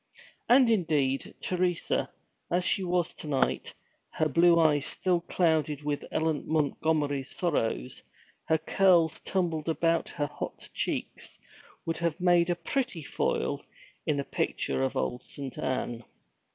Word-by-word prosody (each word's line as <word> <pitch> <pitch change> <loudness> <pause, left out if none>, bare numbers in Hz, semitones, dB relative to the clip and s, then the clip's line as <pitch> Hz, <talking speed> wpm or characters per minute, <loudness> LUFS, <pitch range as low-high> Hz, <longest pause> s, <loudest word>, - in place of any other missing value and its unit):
And 245 -1 +6
indeed, 150 -9 +1
Teresa, 180 -1 0 0.4
as 175 +1 +1
she 195 +2 +2
was 175 -2 0
to - - -9
night, 140 -3 0 0.3
her 155 - 0
blue 170 +3 +5
eyes 150 -3 +3
still 180 -2 0
clouded 155 -4 +1
with 145 -1 -2
Ellen 160 -2 0
Montgomery's 150 -2 0
sorrows, 115 - -1 0.4
her 160 - +3
curls 165 -1 +3
tumbled 165 -4 -1
about 165 0 +1
her 145 - -2
hot 145 0 -7
cheeks, - - -3 0.5
would 165 - -2
have 170 0 -1
made 175 -1 +4
a 175 - +2
pretty 175 - -2
foil - - -1 0.4
in 145 -2 +1
a - - 0
picture 65 - -1
of 65 - 0
old 65 - -2
Saint 135 -3 -7
Anne. 120 -2 -2
160 Hz, 135 wpm, -29 LUFS, 145-175 Hz, 0.5 s, And